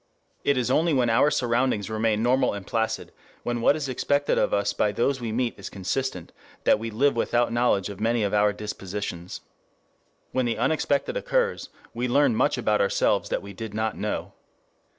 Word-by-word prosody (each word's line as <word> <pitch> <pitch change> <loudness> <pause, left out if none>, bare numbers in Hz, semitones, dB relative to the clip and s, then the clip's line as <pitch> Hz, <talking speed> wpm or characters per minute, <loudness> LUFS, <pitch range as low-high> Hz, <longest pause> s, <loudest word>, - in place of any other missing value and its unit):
] - - -42
It 140 - 0
is 125 0 0
only 165 +4 +3
when 120 -3 +2
our 130 +6 +4
surroundings 120 -5 0
remain 110 0 0
normal 125 +1 +2
and 100 -2 -6
placid, 110 +1 -2 0.3
when 120 -1 -2
what 140 - +4
is 150 -3 -3
expected 145 +2 +1
of - - +1
us 100 0 +1
by 105 - +1
those 130 +4 0
we 115 -2 -3
meet 120 +1 0
is 100 - -7
consistent, 95 -1 -3 0.3
that - - +4
we 115 +1 -4
live 135 +6 +2
without 120 0 +1
knowledge 120 -5 +2
of 100 -2 -8
many 115 +1 +1
of 100 - -1
our 105 0 +4
dispositions. 100 -4 -6 0.9
When 130 -2 0
the 115 - -1
unexpected 140 +3 0
occurs, - - 0 0.2
we 120 +2 -2
learn 135 -1 +3
much - - +2
about 105 -1 +1
ourselves 100 - +1
that - - -2
we 100 0 -9
did 105 +1 -7
not 110 0 -1
know. - - -3
115 Hz, 190 wpm, -25 LUFS, 105-130 Hz, 0.9 s, our